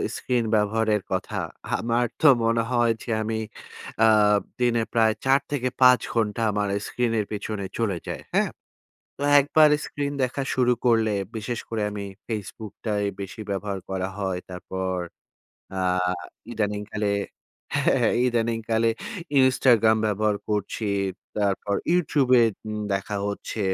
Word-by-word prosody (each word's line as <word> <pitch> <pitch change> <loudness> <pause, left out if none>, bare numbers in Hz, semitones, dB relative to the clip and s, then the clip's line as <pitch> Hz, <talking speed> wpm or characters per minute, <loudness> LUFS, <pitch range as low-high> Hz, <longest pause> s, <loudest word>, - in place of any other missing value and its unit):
Screen 125 -2 0
ব্যবহারের 105 0 +1
কথা। 95 -1 -2 0.4
আমার 120 +1 +1 0.2
তো 155 - +6 0.2
মনে 115 0 +2
হয় 120 -1 +3
যে, - - -15
অ্যা - - -1
আব - - -1
আমি 110 0 -2 1.2
দিনে 120 -2 +2
প্রায় 110 -1 +4
৪ 135 +1 +5
থেকে 130 -3 0
৫ 125 -1 +8
ঘন্টা 110 -1 0
আমার 105 0 0 0.2
স্ক্রিনের 115 -3 0
পেছনে 105 -1 -4
চলে 105 -6 0
যাই। - - -4 0.2
হ্যাঁ? - - +3 0.7
তো - - -7 0.2
একবার 150 +2 +5 0.2
স্ক্রিন 145 -1 -3
দেখা 130 +2 -3
শুরু 125 -1 +3
করলে, 115 -2 +3 0.2
বিশেষ 115 +2 -3
করে 110 -2 -2
আমি 105 -1 -5 0.2
ফেসবুকটাই 105 -1 -4 0.2
বেশি 100 +2 -7
ব্যবহার 100 0 -2
করা 95 0 -2
হয়। 95 -2 -1
তারপর, 95 +1 -4 0.8
অ্যা 95 -1 -2 0.7
ইদানিংকালে, 105 -1 -2 0.7
হ্যাঁ। - - +3 0.2
ইদানিংকালে 115 -1 +1 0.5
ইনস্টাগ্রাম 125 -4 +5
ব্যবহার 105 0 +1
করছি। 105 +1 -2 0.5
তারপর 100 0 0 0.2
ইউটিউবে 140 -7 +3 0.3
উম 105 0 -3 0.2
দেখা 100 +2 -3
হচ্ছে। 100 +2 -5
110 Hz, 125 wpm, -25 LUFS, 105-120 Hz, 1.2 s, ৫